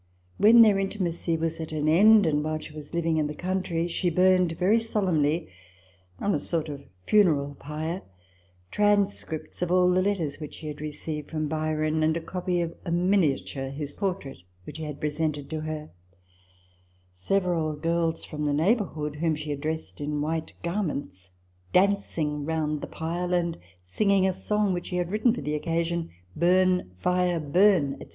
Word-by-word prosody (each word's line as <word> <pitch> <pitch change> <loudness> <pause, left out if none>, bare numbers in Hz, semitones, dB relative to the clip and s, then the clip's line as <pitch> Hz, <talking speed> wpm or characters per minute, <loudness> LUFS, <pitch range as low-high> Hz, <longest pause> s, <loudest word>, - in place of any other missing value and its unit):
When 230 +3 +8
their 210 -3 +5
inti 195 +2 -2
macy 170 -2 0
was 165 0 -2
at 160 -1 -5
an 155 -1 -1
end, 205 +6 +6
and 150 -2 +1
while 155 0 -1
she 155 0 -10
was 150 -1 -10
living 165 -1 +1
in 150 -1 +1
the 150 - -6
country, 180 -2 -1
she 175 +1 0
burned, 180 0 +3
very 205 +6 +3
solemnly, 175 -8 0 0.7
on 205 - 0
a - - +1
sort 160 +1 -2
of 140 -1 -6 0.2
funeral 155 -9 +3
pile, 155 +5 -4 0.7
transcripts 205 -7 0
of 180 -1 0
all 180 0 +4
the 185 +1 +3
letters 185 -8 -1
which 150 -2 -7
she - - -11
had 150 -1 -6
received 150 0 -5
from 155 -1 -2
Byron, 155 0 -1
and 160 +1 +2
a - - -1
copy 180 +1 -2
of 170 -1 -3
a 180 - -5
miniature 170 -7 +1
(his 145 +1 -5
portrait) 185 -8 -3 0.2
which 155 - -9
he 160 - -4
had 150 -2 -6
presented 150 -1 -2
to 160 - -2
her; 155 -1 -5 1.2
several 165 - 0
girls 165 +1 -1
from 150 -1 -4
the 145 - +1
neighbourhood, 160 -4 0
whom 160 0 +1
she 150 0 -5
had 140 -1 -4
dressed 160 0 -4
in 150 0 -2
white 160 +2 -2
garments, 145 - -3 0.4
dancing 175 -6 +1
round 155 -1 -1
the - - -5
pile, 175 +2 -2
and 170 -1 0 0.3
sing 145 - -1
ing 195 -1 +4
a 190 - +2
song 210 +1 0
which 175 -1 -4
she 180 - -4
had 175 0 -1
written 215 +3 +3
for - - -3
the 150 +2 -3
occasion, 165 +2 -1
" 90 0 -31
Burn, 180 - +3
fire, 180 - +1
burn," 160 -1 +3
&c. - - -10
165 Hz, 180 wpm, -26 LUFS, 150-185 Hz, 1.2 s, When